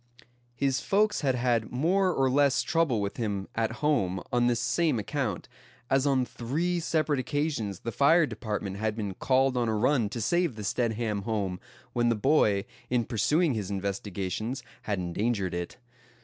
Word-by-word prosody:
His 135 0 +1
folks 210 +2 +1
had 135 -3 +1
had 120 -3 0
more 180 +9 +2
or 135 -5 +2
less 140 +1 +3
trouble 160 -10 +1
with 100 0 -3
him 105 -5 -2
at 115 -1 0
home 95 -12 +1
on 120 0 +3
this 120 -1 +2
same 160 -7 +1
account; 110 -2 -3 0.4
as 135 +1 +3
on 130 -2 +2
three 160 +11 -2
separate 155 -4 0
occasions 130 - -2
the 115 - -3
fire 160 +6 +5
department 105 -5 -4
had 110 0 -1
been 105 -3 -3
called 130 +6 +2
on 120 -2 +1
a 110 - 0
run 120 0 +2
to 115 - -5
save 170 +4 +1
the 105 - -7
Stedham 110 -1 -1
home, 100 -4 -2 0.3
when 120 -1 +2
the 115 - +2
boy, 105 -4 +3 0.2
in 120 -2 +1
pursuing 150 - +2
his 105 -4 -3
investigations, 100 +4 -3 0.2
had 105 -2 -2
endangered 95 +1 -1
it. 85 +4 -4
120 Hz, 165 wpm, -28 LUFS, 105-140 Hz, 0.4 s, fire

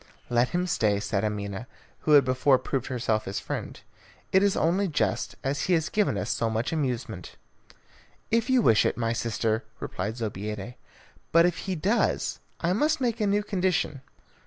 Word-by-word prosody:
"Let 120 +1 +3
him 180 0 0
stay," 105 - +1
said 100 0 -1
Amina, 105 +1 -3 0.3
who 155 - +2
had 140 -2 +7
before 130 +1 +3
proved 135 0 -3
herself 115 -4 -1
his 95 - -3
friend. - - -5 0.5
"It 190 - +5
is 200 -1 +2
only 185 +5 +2
just, 155 - -1
as 135 0 -1
he 185 - +2
has 160 -2 +1
given 205 - +1
us 90 - -2
so 115 - 0
much 110 +6 -1
amusement." 130 -7 -3 1.0
"If 230 +2 +2
you 255 -3 +4
wish 110 - +5
it, - - 0
my 115 -1 0
sister," 115 0 -1 0.2
replied 105 +5 -4
Zobeida; 105 0 -4 0.6
"but 165 +1 +6
if 175 -1 0
he 185 - 0
does, 195 +9 0 0.2
I 170 +1 +2
must 305 +9 +2
make 240 -4 -1
a 210 - +2
new 205 +1 +2
condition. 185 -8 0
135 Hz, 175 wpm, -27 LUFS, 110-185 Hz, 1.0 s, had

